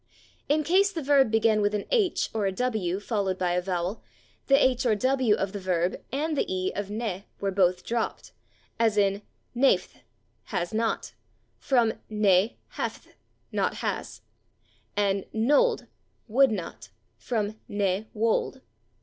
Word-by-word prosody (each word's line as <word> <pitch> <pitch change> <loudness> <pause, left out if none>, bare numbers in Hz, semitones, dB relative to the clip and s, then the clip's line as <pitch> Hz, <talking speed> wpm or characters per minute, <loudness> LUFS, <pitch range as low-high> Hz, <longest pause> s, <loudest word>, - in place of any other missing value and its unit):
In 305 +1 +3
case 385 +6 +3
the 330 -6 -4
verb 275 -3 +4
began 220 -1 +3
with 205 +1 +1
an 205 - -2
/h/ 430 -7 +2
or 215 -3 0
a - - 0
/w/ 195 -4 -1
followed 200 -3 -1
by 180 -1 0
a 180 +1 +1
vowel, 180 +2 -2 0.5
the 275 - +6
/h/ 260 -2 +3
or 230 -4 +3
/w/ 255 -1 +2
of 195 0 -2
the 205 - -5
verb 180 -1 0 0.2
and 300 +4 -1
the - - +2
/e/ 185 0 -2
of 205 0 -3
/ne/ 205 -2 -4
were 200 -1 -1
both 185 -2 +2
dropped, 235 -1 -3 0.5
as 225 -2 +2
in 200 0 +2 0.3
/naefth/ 265 +3 +2 0.5
(=/has 175 +2 -3
not/), 225 +1 -1 0.5
from 240 -4 +2 0.2
/ne 210 -1 +3 0.2
haefth/ - - -5 0.4
(=/not - - 0
has/), - - -3 0.8
and 200 -1 +1
/nolde/ 295 - +3 0.4
(=/would 265 +5 +5
not/), 195 -6 -5 0.3
from 215 -2 -3
/ne 205 +1 0
wolde 225 +4 0
215 Hz, 150 wpm, -27 LUFS, 195-255 Hz, 0.8 s, the